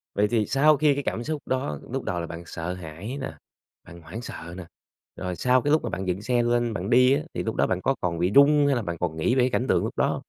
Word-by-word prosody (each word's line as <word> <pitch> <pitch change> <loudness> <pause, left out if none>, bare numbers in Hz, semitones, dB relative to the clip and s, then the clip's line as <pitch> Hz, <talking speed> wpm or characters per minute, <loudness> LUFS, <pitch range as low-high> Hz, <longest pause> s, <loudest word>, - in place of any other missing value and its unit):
Vậy 105 +1 +3
thì 110 -2 +1
sau 150 +2 +4
khi 150 -2 +4
cái 140 0 -3
cảm 120 - -2
xúc 155 -1 -3
đó, 130 - -2
lúc - - -3
đầu 90 -1 -2
là 85 - -4
bạn 85 +1 -8
sợ 85 +2 -5
hãi 90 - -7
nè, - - -4 0.5
bạn 85 0 -13
hoảng 90 +9 -8
sợ 85 -6 -8
nè, 90 - -7 0.5
rồi 90 -1 -4
sau 125 +7 +3
cái 145 - 0
lúc 155 - +3
mà - - -2
bạn 95 +1 -4
dựng 90 +2 -1
xe 120 +2 +1
lên 120 -1 +1
bạn 95 0 -4
đi 125 +2 +5
á, 145 - +1
thì - - -3
lúc 110 - -3
đó - - +2
bạn 95 0 -1
có 135 - +1
còn 85 -2 -1
bị 90 +3 +1
rung 145 +1 +6
hay 140 - +3
là 120 - 0
bạn 85 -4 -4
còn 80 -2 -2
nghĩ 120 +11 +1
về 130 0 +3
cảnh 125 +1 -1
tượng - - +2
lúc - - -5
đó - - +3
hông? - - -1
115 Hz, 290 wpm, -25 LUFS, 90-130 Hz, 0.5 s, rung